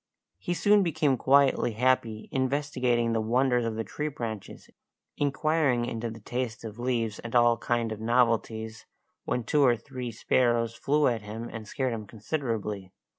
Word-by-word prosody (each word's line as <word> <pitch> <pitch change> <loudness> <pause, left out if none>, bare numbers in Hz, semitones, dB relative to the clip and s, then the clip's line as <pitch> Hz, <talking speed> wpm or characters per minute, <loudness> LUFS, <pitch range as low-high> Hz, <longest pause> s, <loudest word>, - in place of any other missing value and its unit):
He 175 - -2
soon 205 +3 +4
became 155 -6 +2
quietly 135 -2 +3
happy, 115 -2 +1
investigating 130 -3 0
the 110 - +1
wonders 125 +2 +2
of 115 0 -2
tree 150 +10 -4
branches, 115 -8 -6 0.5
inquiring 145 -3 +1
into 115 -1 -3
the 110 0 -9
taste 120 +1 -4
of 110 0 -8
leaves 120 -3 -1
and 115 +1 -6
all 120 -1 +5
kind 115 0 -1
of 110 0 -5
novelties, 115 -2 0 0.4
when 125 - -1
two 145 +6 +2
or 125 -4 +5
three 125 -1 -6
sparrows 115 0 +1
flew 145 +5 +1
at 115 -3 +1
him 110 +3 -6
and 110 -2 -7
scared 130 +2 -1
him 110 -2 -6
considerably. 105 - -4
120 Hz, 155 wpm, -28 LUFS, 110-130 Hz, 0.5 s, all